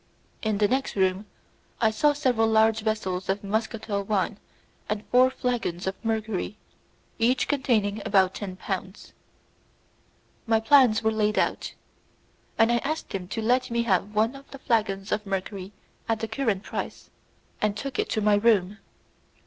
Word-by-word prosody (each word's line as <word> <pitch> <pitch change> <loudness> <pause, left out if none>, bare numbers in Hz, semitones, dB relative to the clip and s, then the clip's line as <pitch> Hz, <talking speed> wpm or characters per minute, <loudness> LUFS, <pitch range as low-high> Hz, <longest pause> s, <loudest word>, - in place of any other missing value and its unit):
In 215 -2 0
the 205 0 +3
next 265 +4 -1
room 190 +1 +1 0.5
I 220 -1 +3
saw 295 +7 +3
several 255 -6 +2
large 220 0 +4
vessels 195 -4 -2
of 195 +1 -1
muscatel 215 0 -2
wine 200 0 -1 0.5
and 210 0 -2
four 255 +1 +6
flagons 240 -9 -2
of 190 - -1
mercury, 220 -3 -2 0.6
each 240 +3 +2
containing 220 -7 +1
about 190 -1 +3
ten 195 -3 -6
pounds. 190 +1 -6 1.3
My 225 0 +3
plans 225 -2 +5
were 220 - +3
laid, 215 -1 0
and - - -1 1.0
I 240 - +3
asked 310 +6 -3
him 185 -2 -4
to 225 +3 -4
let 250 +3 +2
me 235 0 0
have 205 -1 0
one 225 +5 +2
of 275 0 -13
the 275 - -9
flagons 210 -6 -1
of 210 - 0
mercury 195 0 -4 0.4
at 225 -1 +1
the 225 - -3
current 225 -4 -1
price, - - -6 0.5
and 210 -1 0
took 275 +3 -5
it - - 0
to 215 - 0
my 210 0 +3
room. 205 -2 +2
215 Hz, 155 wpm, -26 LUFS, 200-235 Hz, 1.3 s, four